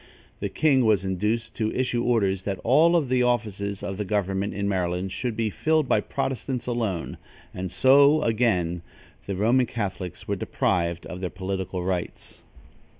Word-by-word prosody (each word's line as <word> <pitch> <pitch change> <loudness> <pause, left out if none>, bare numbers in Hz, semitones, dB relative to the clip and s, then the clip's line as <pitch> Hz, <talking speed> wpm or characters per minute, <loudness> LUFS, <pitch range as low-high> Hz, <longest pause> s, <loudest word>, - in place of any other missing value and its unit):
The 100 - -2
king 135 +5 +3
was 105 -4 +3
induced 105 +5 -1
to 110 -1 0
issue 125 -2 0
orders 100 -6 +1
that 95 -1 -3
all 160 +8 +5
the 130 -4 0
offices 105 -5 -1
of 95 - -4
the 105 - -1
government 100 0 -1
in 100 0 -1
Maryland 90 -1 -1
should 120 +2 -3
be 110 -2 0
filled 155 +5 +1
by - - +3
Protestants 130 -1 -3
alone; 115 -8 -2 0.4
and 90 -1 -5
so, 140 +8 +5
again, 100 -7 +1 0.5
the 100 - -2
Roman 120 +6 +3
Catholics 95 -5 -5
were - - 0
deprived 85 -2 -1
of 90 0 -7
their 90 - -2
political 95 0 -4
rights. 90 -1 -4
105 Hz, 155 wpm, -25 LUFS, 95-120 Hz, 0.5 s, all